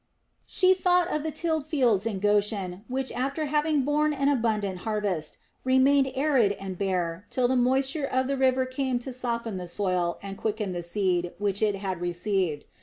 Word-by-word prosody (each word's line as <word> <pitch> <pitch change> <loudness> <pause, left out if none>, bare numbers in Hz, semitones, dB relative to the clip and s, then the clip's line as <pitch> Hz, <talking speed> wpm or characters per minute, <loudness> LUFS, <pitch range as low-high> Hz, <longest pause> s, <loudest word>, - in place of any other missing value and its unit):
She 370 -1 +4
thought 360 -1 +2
of 305 - 0
the 315 - -2
tilled 315 -1 -1
fields 240 - +2
in 210 -4 -2
Goshen 205 -2 0
which, 260 +1 -2
after 275 +5 -2
having 300 0 +1
borne 300 +2 +1
an 275 0 +1
abundant 215 -8 0
harvest, 200 -7 -2 0.3
remained 265 +1 +4
arid 265 -7 +3
and 195 -2 -6
bare 180 -1 -2
till 250 -1 +1
the 260 - +1
moisture 265 +4 +2
of 260 -1 0
the 275 +1 -1
river 260 -1 +2
came 255 -1 -1
to 250 +2 -5
soften 235 -4 -3
the 180 -1 -6
soil 180 -1 -1
and 195 0 -7
quicken 210 -2 -2
the 175 -1 -3
seed 175 -1 -1
which 200 -1 -1
it 210 -2 +2
had 190 -3 -4
received. 175 -3 -1
235 Hz, 180 wpm, -27 LUFS, 195-275 Hz, 0.3 s, She